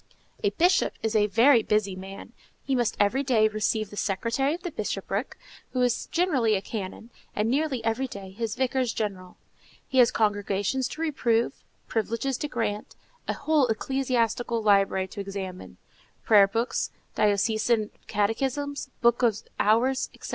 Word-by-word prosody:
A 410 - +4
Bishop 360 0 +2
is 220 0 -1
a 210 -1 +4
very 230 +5 +5
busy 210 -3 0
man: 195 +4 -9 0.3
he 275 - -1
must 240 -4 +1
every 205 +7 +3
day 240 -6 +3
receive 215 0 -1
the - - -9
secretary 230 +9 0
of 350 - -12
the 350 - -4
bishopric, 205 0 -3 0.4
who 255 - 0
is 245 -1 0
generally 275 - +2
a - - +1
canon, 220 +2 -6 0.2
and 215 +2 +1
nearly 270 -4 0
every 230 +4 0
day 195 -5 -9
his 225 +2 -3
vicars 260 -2 0
general. 190 -4 -4 0.5
He 260 - +1
has 240 -2 +7
congregations 205 +3 0
to 315 - -7
reprove, 240 -7 0 0.2
privileges 230 +4 -1
to 295 - -2
grant, 225 -6 -3 0.3
a - - 0
whole 295 -2 +2
ecclesiastical 240 -1 0
library 195 -2 +3
to 200 - -7
examine,—prayer 195 +1 0
books, 230 +4 -1 0.2
diocesan 215 +1 +1 0.2
catechisms, 265 +7 -1
books 235 +1 +4
of 220 -3 +1
hours, 240 +5 +2
etc. - - -9
225 Hz, 145 wpm, -26 LUFS, 205-260 Hz, 0.5 s, has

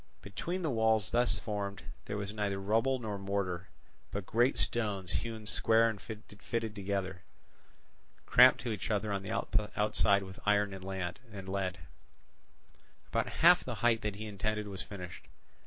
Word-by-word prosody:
Between 170 - -4
the 155 - +1
walls 110 -2 +2
thus 120 +1 +3
formed 100 -2 -4 0.2
there 105 - -3
was 100 0 -4
neither 100 -2 -1
rubble 115 +7 +2
nor 105 -4 -4
mortar, 95 -2 -2 0.4
but 100 -2 -4
great 120 +6 +2
stones 100 -6 0
hewn 110 -2 -3
square 115 +2 +3
and 105 -3 -3
fitted 110 +2 -5
together, 95 -2 -3 1.0
cramped - - +7
to 120 - -2
each 100 -3 -3
other 105 -1 0
on 100 - -1
the 100 - -7 0.5
outside 100 -2 +3
with 95 0 -10
iron 105 -1 +2
and 95 -1 -8
lead. 95 0 -4 1.3
About - - 0
half - - +6
the - - -4
height 115 -1 +4
that 105 -3 -2
he 110 +2 -6
intended 105 +1 -2
was 95 -2 -5
finished. 90 -4 -8
105 Hz, 150 wpm, -32 LUFS, 95-110 Hz, 1.3 s, cramped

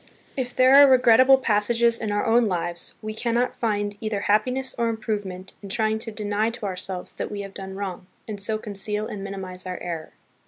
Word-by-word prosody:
If 250 -2 -3
there 255 +1 +5
are 285 0 +10
re 265 - +6
regrettable 255 +2 +6
passages 230 0 +2
in 215 -2 -2
our 205 0 0
own 230 0 +4
lives, 175 -2 -3
we 215 0 -4
cannot 235 +2 0
find 205 -2 -1
either 215 -2 -2
happiness 250 +6 +1
or 235 -1 0
improvement 205 -4 -4
in 200 - -9
trying 220 0 0
to 225 0 -6
deny 210 +1 -1
to 230 -2 -6
ourselves 185 -1 -5
that - - -4
we 205 -1 -5
have 195 -1 -8
done 190 -1 -7
wrong, 190 -2 -5 0.2
and 210 -2 -4
so 215 +2 0
conceal 210 0 -2
and 205 -2 -6
minimize 190 -2 -6
our 180 - -4
error. 165 -3 -6
210 Hz, 200 wpm, -24 LUFS, 195-230 Hz, 0.2 s, are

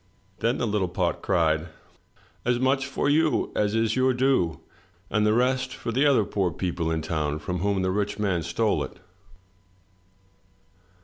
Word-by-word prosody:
Then 115 +3 +1
the 120 - -1
little 105 -4 0
pot 90 -2 -1
cried: 80 -2 +1 0.8
"As 125 0 +1
much 135 +1 +1
for 140 - -1
you 155 +2 +2
as 105 +1 +1
is 115 0 +1
your 130 0 +2
due, 125 - +1 0.5
and 105 -1 +2
the - - +4
rest 130 +2 +1
for - - -4
the 135 +5 +3
other 125 -7 +4
poor 95 -3 0
people 85 -1 -2
in 80 -1 -1
town 75 -2 -1
from 90 +3 -4
whom 100 0 0
the 95 - +1
rich 105 +1 -1
man 100 -5 0
stole 85 +7 0
it." - - -9
105 Hz, 165 wpm, -25 LUFS, 85-125 Hz, 0.8 s, the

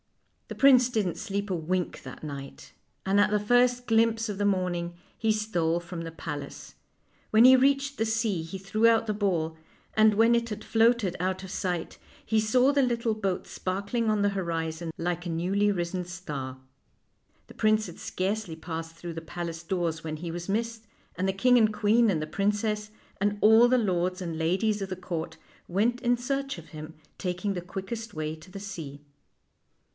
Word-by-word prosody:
The - - -7
prince 255 -3 +6
didn't 210 -8 0
sleep 200 +1 -3
a 185 - 0
wink 175 +2 -2
that - - -10
night, 140 -2 -8 0.3
and 195 +1 +4
at 205 - +4
the 210 0 +2
first 245 +3 +3
glimpse 225 0 +2
of 205 - -4
the 205 - +1
morning 180 -3 0 0.2
he 220 -1 +1
stole 175 -6 0
from 170 0 -7
the 165 0 -6
palace. 145 - -7 0.6
When 220 +2 +6
he 260 +1 +9
reached 275 +2 +2
the 225 - +1
sea 220 -5 0
he 165 +4 -6
threw 215 +4 +2
out 230 0 +4
the 215 - -1
ball, 175 -6 0 0.4
and 215 -1 +5
when 225 +2 +5
it 235 0 0
had 215 0 -5
floated 225 -4 +2
out 185 +1 -1
of 190 - -8
sight, 180 -5 -3 0.3
he 220 - +2
saw 250 +6 +3
the 280 - +4
little 235 -3 +1
boat 195 -4 -2
sparkling 200 +5 -2
on 210 -1 +2
the 205 - +4
horizon 165 -3 -3
like 175 +1 -2
a - - -3
newly 190 +5 +1
risen 180 -1 -2
star. 150 -8 -6 0.9
The - - -14
prince 215 0 +2
had 175 - -10
scarcely 190 -2 -2
passed 165 0 -6
through 170 0 -7
the 165 - -6
palace 165 0 -5
doors 170 -2 -2
when 155 -1 -4
he 170 +1 -5
was 175 +2 -6
missed, 225 +2 -2 0.3
and 185 +2 0
the - - +3
king 245 +6 +4
and 215 -1 +4
queen 220 +2 +3
and 165 -6 +1
the 155 - -3
princess, 210 +3 -1 0.3
and 205 0 +1
all 220 +3 +7
the 255 +1 +4
lords 185 -4 0
and 170 -3 -4
ladies 195 +6 +1
of 195 - -3
the 185 - -3
court, 165 -3 -5 0.3
went 230 +7 +1
in 245 -1 +2
search 275 +3 -2
of - - -12
him, 155 0 -9 0.2
taking 185 +2 -2
the 180 - -4
quickest 195 +5 -6
way 155 0 -3
to 160 +4 -15
the 195 +2 -8
sea. 160 -8 -7
195 Hz, 190 wpm, -28 LUFS, 170-220 Hz, 0.9 s, he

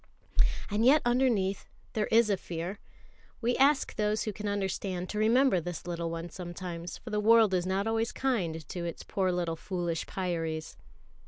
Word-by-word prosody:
And 210 +2 +1
yet 280 +5 +6
underneath 240 -6 +1 0.3
there 215 -1 0
is 225 -1 +4
a - - +4
fear; 170 -1 -4
and 200 - -7 0.6
we 245 +1 +1
ask 275 +1 +3
those 210 0 +1
who 215 - -3
can 210 +1 -5
understand 190 -2 -2
to 210 - -2
remember 225 -3 +4
this 175 -1 -6
little 170 -1 -3
one 165 0 -5
sometimes, 175 -1 -6
for 230 - -10
the 210 - +1
world 220 -1 +5
is 180 0 +1
not 190 +2 0
always 225 +1 0
kind 170 - -1
to 175 - -5
its 170 -1 -5
poor 190 -2 0
little 175 -2 -1
foolish 175 -1 -3
Pyâries. 165 -4 -3
190 Hz, 175 wpm, -30 LUFS, 175-220 Hz, 0.6 s, yet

